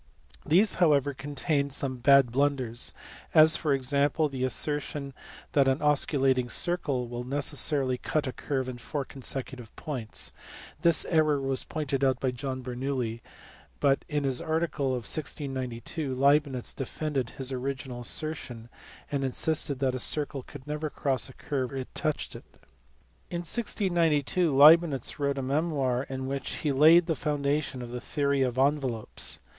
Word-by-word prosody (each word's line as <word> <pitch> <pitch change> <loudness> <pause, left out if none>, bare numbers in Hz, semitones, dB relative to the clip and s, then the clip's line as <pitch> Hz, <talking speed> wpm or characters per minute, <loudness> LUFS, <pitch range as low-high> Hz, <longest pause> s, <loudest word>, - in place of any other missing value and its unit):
These 185 +7 +5
however 145 -4 +4
contain 140 +1 -1
some 135 -1 -2
bad 135 0 +5
blunders; 130 -3 0 0.4
as, 155 0 +8
for 155 - -1
example, 140 +3 +1
the 130 -2 -4
assertion 140 +1 -2 0.4
that 140 -2 +3
an 135 0 +3
osculating 135 -4 +2
circle 145 -6 -1
will 120 +1 -5
necessarily 135 -1 +1
cut 155 -2 -1
a 130 - -3
curve 135 -3 -3
in 125 -1 -6
four 140 +3 -4
consecutive 130 -3 -6
points: 125 -8 -4 0.5
this 170 -1 +3
error 155 -3 +2
was 135 -1 -1
pointed 140 -4 -2
out 130 -1 +2
by 130 - 0
John 130 +1 -5
Bernoulli, 125 -2 -3 0.6
but 140 -1 +2
in 150 -2 -1
his 135 -2 0
article 160 -3 -1
of 125 -3 -2
1692 135 -1 -3
Leibnitz 140 -1 +2
defended 135 -2 -3
his 135 0 -3
original 130 -1 -4
assertion, 120 -4 -3 0.4
and 140 -1 -1
insisted 140 +1 0
that 130 -1 0
a 130 - -3
circle 145 0 -1
could 130 0 -12
never 150 +1 -3
cross 135 -3 -1
a - - -12
curve 130 -2 -3
where 135 - -5
it 130 - -11
touched 155 -1 -2
it. - - -10 0.8
In 170 -1 -3
1692 175 - +1
Leibnitz 150 -1 +5
wrote 140 -1 0
a 135 - -2
memoir 135 -3 0
in 130 0 -4
which 135 +1 -3
he 145 - +3
laid 160 +5 +6
the 165 - 0
foundation 145 -2 -1
of 120 - -8
the 125 0 -5
theory 140 -1 0
of 125 -1 0
envelopes. 135 -5 0
140 Hz, 150 wpm, -28 LUFS, 130-150 Hz, 0.8 s, as